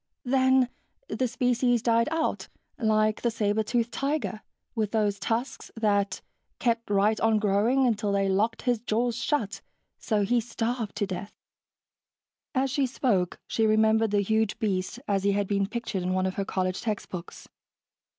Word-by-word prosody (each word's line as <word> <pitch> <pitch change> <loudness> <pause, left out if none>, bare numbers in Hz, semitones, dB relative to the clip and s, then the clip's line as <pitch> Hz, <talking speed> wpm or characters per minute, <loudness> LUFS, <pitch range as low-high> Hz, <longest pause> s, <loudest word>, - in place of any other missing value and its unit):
"Then 260 0 +3 0.4
the 255 - 0
species 245 -1 +1
died 230 +2 +3
out, 320 0 -1 0.3
like 215 -2 +2
the 240 - +2
saber 220 -1 0
tooth 235 +2 -1
tiger, 275 -8 -2 0.3
with 220 -3 -1
those 205 -2 +1
tusks 230 +6 -2
that 205 -3 +1 0.4
kept 235 -2 0
right 205 +2 +2
on 225 -1 +3
growing 215 +6 +2
until 210 -4 +1
they 200 0 +1
locked 210 +4 0
his 245 -3 +1
jaws 235 +1 0
shut, 230 -5 -1 0.4
so 215 -3 0
he 240 +3 +2
starved 230 -1 -3
to 205 - 0
death." 195 +1 -6 1.2
As 265 0 +1
she 275 -1 +1
spoke, 205 -9 0
she 225 -1 +1
remembered 220 +1 +3
the 205 0 +2
huge 220 +1 +1
beast 205 0 -2
as 195 -1 +1
he 200 0 +3
had 200 0 0
been 200 -1 +1
pictured 230 -4 -3
in 185 +1 -1
one 185 0 +1
of 190 - -1
her 195 - -2
college 185 -1 -1
textbooks. 195 -5 -5
220 Hz, 160 wpm, -27 LUFS, 200-240 Hz, 1.2 s, Then